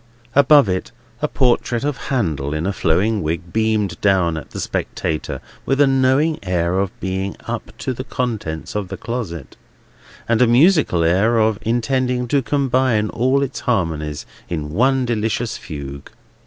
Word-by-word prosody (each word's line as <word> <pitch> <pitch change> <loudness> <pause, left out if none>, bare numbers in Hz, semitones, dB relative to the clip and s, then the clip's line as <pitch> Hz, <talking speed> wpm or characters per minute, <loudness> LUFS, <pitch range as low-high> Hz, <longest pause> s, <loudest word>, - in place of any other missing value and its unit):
Above 140 -1 +6
it, 95 -1 -2 0.3
a - - +2
portrait 120 -1 +1
of 145 -1 0
Handel 75 - -1
in 80 +2 -2
a 100 - 0
flowing 100 +7 +1
wig 85 +2 -3
beamed 110 -5 0
down 95 -5 +3
at 80 - -7
the - - -7
spectator, 80 -1 -3 0.2
with 135 +1 0
a 145 - +7
knowing 135 +4 +2
air 90 -1 0
of 100 -1 0
being 95 +1 -3
up - - -5
to 130 - -3
the 130 - -5
contents 110 - -3
of 105 -2 -2
the 95 0 -6
closet, 85 - -5 0.7
and 115 0 +2
a 125 - +6
musical 135 - +4
air 100 +8 +3
of 110 -1 +2
intending 125 +2 0
to 140 +3 +2
combine 130 -5 +1
all 130 +4 +2
its 135 -1 -4
harmonies 80 -9 -1 0.2
in 75 -4 -3
one 130 - +2
delicious 115 0 -1
fugue. 70 -3 -8
110 Hz, 155 wpm, -20 LUFS, 85-130 Hz, 0.7 s, a